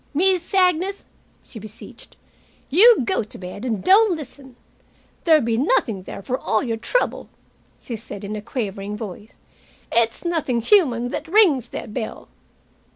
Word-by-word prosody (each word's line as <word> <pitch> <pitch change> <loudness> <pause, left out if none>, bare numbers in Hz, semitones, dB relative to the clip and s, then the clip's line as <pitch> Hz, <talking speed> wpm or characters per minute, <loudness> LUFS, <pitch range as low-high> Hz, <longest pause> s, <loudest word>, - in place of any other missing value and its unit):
"Miss 360 +1 +1
Agnes," 370 +1 +1 0.4
she 225 - -10
beseeched, 215 +1 -12 0.5
"you 435 - +7
go - - 0
to 215 - -9
bed 185 +4 -8
and 225 -7 -2
don't 400 -1 +5
listen. 270 -3 -11 0.7
There'll 315 -4 +5
be 225 -1 0
nothing 245 - +1
there, 195 - -9
for 255 +4 -2
all 215 - 0
your 230 -3 -2
trouble," - - -1 0.5
she 235 - -7
said, 205 -2 -9
in 205 +1 -5
a 210 - -5
quavering 210 -3 -5
voice. 210 +1 -9 0.5
"It's 230 +6 +1
nothing 305 -9 0
human 245 - +3
that 305 - -5
rings 325 - +4
that 215 - -7
bell." 220 -2 -6
245 Hz, 150 wpm, -22 LUFS, 215-345 Hz, 0.7 s, you